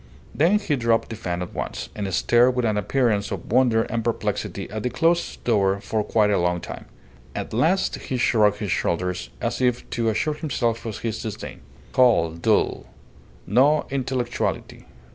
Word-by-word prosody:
Then 170 Hz, +8 st, +4 dB
he 170 Hz, -8 st, -1 dB
dropped 115 Hz, -3 st, +1 dB
the 115 Hz, -, -5 dB
fan 90 Hz, -4 st, -3 dB
at 90 Hz, -, -9 dB
once, -, -, -5 dB
and 100 Hz, -2 st, -4 dB
stared 120 Hz, +6 st, +3 dB
with 125 Hz, -1 st, +1 dB
an 110 Hz, -2 st, +1 dB
appearance 105 Hz, -1 st, +1 dB
of -, -, -6 dB
wonder 120 Hz, -2 st, +4 dB
and 115 Hz, 0 st, -3 dB
perplexity 115 Hz, 0 st, -2 dB
at 110 Hz, 0 st, -4 dB
the 125 Hz, -, -1 dB
closed 165 Hz, +7 st, 0 dB
door 100 Hz, -4 st, +2 dB
for 110 Hz, +1 st, -2 dB
quite 105 Hz, 0 st, +2 dB
a 100 Hz, -, +2 dB
long 90 Hz, 0 st, +1 dB
time. -, -, -8 dB, 0.5 s
At -, -, -5 dB
last 165 Hz, -, +2 dB
he 130 Hz, -, -4 dB
shrugged 105 Hz, -4 st, +3 dB
his 105 Hz, -3 st, -3 dB
shoulders 90 Hz, 0 st, -1 dB
as -, -, -2 dB
if 125 Hz, -1 st, +1 dB
to 115 Hz, -1 st, 0 dB
assure 130 Hz, +8 st, 0 dB
himself 120 Hz, -7 st, -2 dB
of 110 Hz, -, -4 dB
his 115 Hz, -1 st, -3 dB
disdain. 110 Hz, -3 st, -7 dB, 0.3 s
Cold, 85 Hz, -10 st, +3 dB
dull. -, -, +1 dB, 0.6 s
No 140 Hz, +8 st, +3 dB
intellectuality. 130 Hz, -2 st, -2 dB
115 Hz, 170 wpm, -23 LUFS, 105-130 Hz, 0.6 s, Then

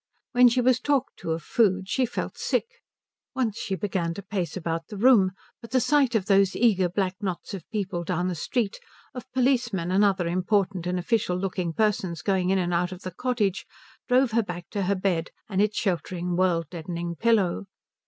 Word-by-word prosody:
When 245 Hz, -1 st, +6 dB
she 250 Hz, +2 st, +1 dB
was 250 Hz, 0 st, +3 dB
talked 275 Hz, 0 st, 0 dB
to -, -, -7 dB
of 160 Hz, 0 st, -2 dB
food, 190 Hz, -3 st, +2 dB
she 255 Hz, +4 st, +1 dB
felt 240 Hz, -, -4 dB
sick. -, -, 0 dB, 0.7 s
Once 235 Hz, -5 st, -1 dB
she 195 Hz, -, -2 dB
began 180 Hz, -3 st, -2 dB
to 200 Hz, -, -7 dB
pace 190 Hz, -4 st, -3 dB
about 165 Hz, -1 st, -3 dB
the 210 Hz, -, -8 dB
room, 205 Hz, -5 st, +5 dB, 0.3 s
but 230 Hz, -, -10 dB
the 255 Hz, +3 st, +2 dB
sight 270 Hz, -2 st, +2 dB
of 205 Hz, -4 st, +1 dB
those 195 Hz, -1 st, +3 dB
eager 195 Hz, -6 st, +3 dB
black 185 Hz, 0 st, -1 dB
knots 185 Hz, -2 st, -4 dB
of 185 Hz, -5 st, -8 dB
people 190 Hz, -5 st, -3 dB
down 175 Hz, +1 st, -1 dB
the 185 Hz, -, -1 dB
street, 205 Hz, -, -2 dB, 0.3 s
of 255 Hz, +1 st, -9 dB
policemen 245 Hz, -9 st, +1 dB
and 195 Hz, +2 st, +4 dB
other 190 Hz, -4 st, +2 dB
important 185 Hz, 0 st, 0 dB
and 180 Hz, 0 st, 0 dB
official 180 Hz, -1 st, 0 dB
looking 180 Hz, -2 st, -2 dB
persons 185 Hz, -4 st, 0 dB
going 190 Hz, -2 st, +1 dB
in 195 Hz, -, +3 dB
and 175 Hz, -1 st, 0 dB
out 175 Hz, +1 st, +1 dB
of 185 Hz, 0 st, -9 dB
the 185 Hz, -, -5 dB
cottage, 210 Hz, -3 st, -1 dB, 0.4 s
drove 255 Hz, -1 st, +3 dB
her 230 Hz, +1 st, +3 dB
back 175 Hz, -4 st, -7 dB
to 205 Hz, -, -2 dB
her 200 Hz, +2 st, +1 dB
bed 185 Hz, -3 st, -1 dB, 0.2 s
and 195 Hz, -2 st, 0 dB
its 210 Hz, 0 st, +1 dB
sheltering, 180 Hz, -2 st, -1 dB
world 175 Hz, -2 st, +2 dB
deadening 170 Hz, 0 st, -5 dB
pillow. 200 Hz, -3 st, +1 dB
195 Hz, 195 wpm, -26 LUFS, 180-225 Hz, 0.7 s, When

